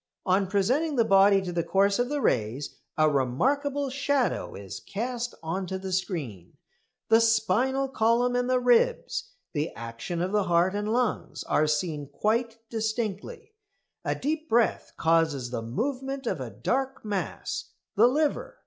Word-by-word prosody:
On 190 +1 +2
presenting 250 - +1
the 230 -3 +3
body 195 0 +5
to 180 - -4
the 170 -1 0
course 200 +3 +2
of 245 +1 +1
the 290 -1 -1
rays 115 - 0 0.2
a 155 0 +5
remarkable 270 - 0
shadow 275 -1 0
is 100 -1 -7
cast 240 +3 -4
on 180 +4 -3
to 190 - -3
the 190 0 -6
screen. 145 - -4 0.5
The 225 +1 +6
spinal 230 +5 +2
column 245 0 +2
and 245 0 0
the 255 0 +3
ribs; 250 - +2 0.2
the 150 0 -1
action 115 +9 -5
of 180 +2 -1
the 205 -2 +2
heart 175 +2 +3
and 210 +1 -2
lungs 240 -1 -1
are 155 - +2
seen 150 -1 -1
quite 225 - 0
distinctly. 225 - -3 0.5
A - - -1
deep 310 +2 -3
breath 235 0 +2
causes 160 -6 +1
the 120 - -2
movement 265 - -3
of - - -2
a - - -4
dark 265 -2 -2
mass 205 -3 -3 0.3
the 220 +3 +6
liver. 295 +4 0
215 Hz, 155 wpm, -27 LUFS, 170-255 Hz, 0.5 s, The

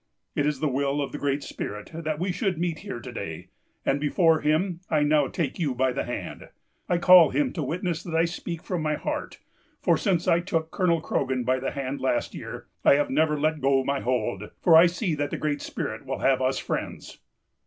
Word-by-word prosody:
It 145 - +1
is 150 -3 -2
the 155 - +2
will 140 +1 0
of 140 - -2
the 145 - -6
Great 140 0 -1
Spirit 105 0 -6
that 155 -2 -3
we 180 +3 -1
should 185 0 -1
meet 170 -2 -2
here 200 -11 -6
to 110 - -8
day; - - -6 0.4
and 135 - +2
before 160 +2 +3
him 165 +4 +1
I 150 -2 +2
now 145 -1 +3
take 150 +1 -3
you 145 -7 0
by 130 +1 +2
the 130 - -2
hand. 125 - -6 0.4
I 175 - +3
call 175 -1 +8
him 285 -3 0
to 165 - -3
witness 170 +3 -2
that 170 -2 -5
I 165 +1 +4
speak 170 0 -5
from 180 -3 -2
my 155 -1 0
heart; - - -4 0.4
for - - +2
since 180 -5 0
I 170 - +4
took 165 -3 -2
Colonel 170 -4 +1
Croghan 130 -4 -1
by 130 +2 +1
the 135 - -2
hand 140 0 -4
last 120 -2 0
year, - - -7 0.2
I - - +7
have 145 - 0
never 150 +1 +2
let 155 0 0
go 135 0 +3
my 140 +1 -1
hold, 105 -5 -2
for 170 - +5
I 165 +2 +9
see 175 0 -1
that 145 -1 -1
the - - -3
Great 150 -2 -2
Spirit - - -5
will - - -2
have - - +2
us - - +1
friends. - - -5
155 Hz, 220 wpm, -26 LUFS, 140-170 Hz, 0.4 s, I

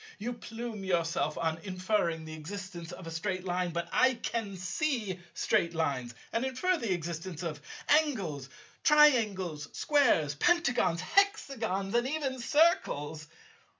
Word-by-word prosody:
You 235 +4 -3
plume 230 -2 -6
yourself 170 -5 0
on 160 0 -1
inferring 185 -3 -1
the 155 - -7
existence 175 +1 -7
of 175 0 -9
a 165 - -6
Straight 185 +3 -3
Line; 180 0 0
but 170 0 -3
I 260 -1 +4
can 225 -4 -3
see 195 - -1 0.2
Straight 170 0 +1
Lines, 130 -7 -1 0.2
and 230 - +1
infer 265 +8 +1
the 235 - -2
existence 170 0 -4
of 155 -4 -4 0.3
Angles, 195 - +1 0.3
Triangles, 215 - +4
Squares, 235 - +3
Pentagons, 245 - +2
Hexagons, 225 - +1
and 240 +1 +2
even 270 -3 -2
Circles. 160 - +2
190 Hz, 130 wpm, -30 LUFS, 165-245 Hz, 0.3 s, I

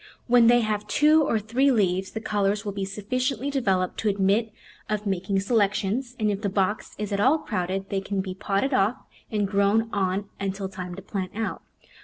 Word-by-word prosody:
When 240 -1 +5
they 240 +1 +6
have 210 -1 -2
two 305 +6 +4
or 230 - +1
three 235 +6 +1
leaves 190 -6 +1
the 220 - -6
colours 205 0 0
will 205 - -2
be 195 -1 -3
sufficiently 255 +7 -2
developed 190 -9 0
to 215 - +1
admit 200 +3 +1 0.4
of 210 0 -2
making 195 0 -1
selec 200 0 +2
tions, 235 +5 -2
and 215 -1 +2
if 200 0 -3
the 205 - 0
box 195 +2 -1
is 210 -1 -4
at 200 - 0
all 265 +9 +4
crowded 190 - -3
they 195 -1 0
can 195 0 -3
be 190 -1 -3
potted 200 +7 -1
off 225 +1 +2 0.3
and 210 -3 0
grown 205 +3 +2
on 195 0 0
until 195 0 -3
time 180 -2 -7
to 195 - -9
plant 190 -2 -4
out. 225 0 -3
205 Hz, 200 wpm, -25 LUFS, 195-225 Hz, 0.4 s, they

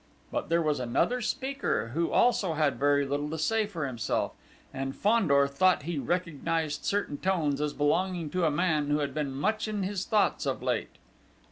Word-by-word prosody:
But - - -3
there 165 0 +2
was 150 -3 0
another 130 - 0
speaker, 265 - -1
who 165 +7 -1
also 205 -8 +3
had 150 -2 +1
very 145 0 +3
little 145 +2 -2
to 160 - -4
say 215 +7 +1
for 170 -8 -4
himself; 120 -5 -1 0.4
and 135 0 -4
Fandor 170 -11 +3
thought 160 +5 +2
he 165 -1 -3
recognised 165 -2 -2
certain 200 -8 -1
tones 155 -7 0
as 150 -1 -1
belonging 170 +2 0
to 180 -2 +1
a - - +4
man 155 -1 +1
who 145 - +2
had 140 -2 -2
been 150 -2 -2
much 215 +12 -1
in 210 -2 -2
his 190 0 -2
thoughts 215 -1 +1
of - - -2
late. - - -2
160 Hz, 180 wpm, -29 LUFS, 145-190 Hz, 0.4 s, a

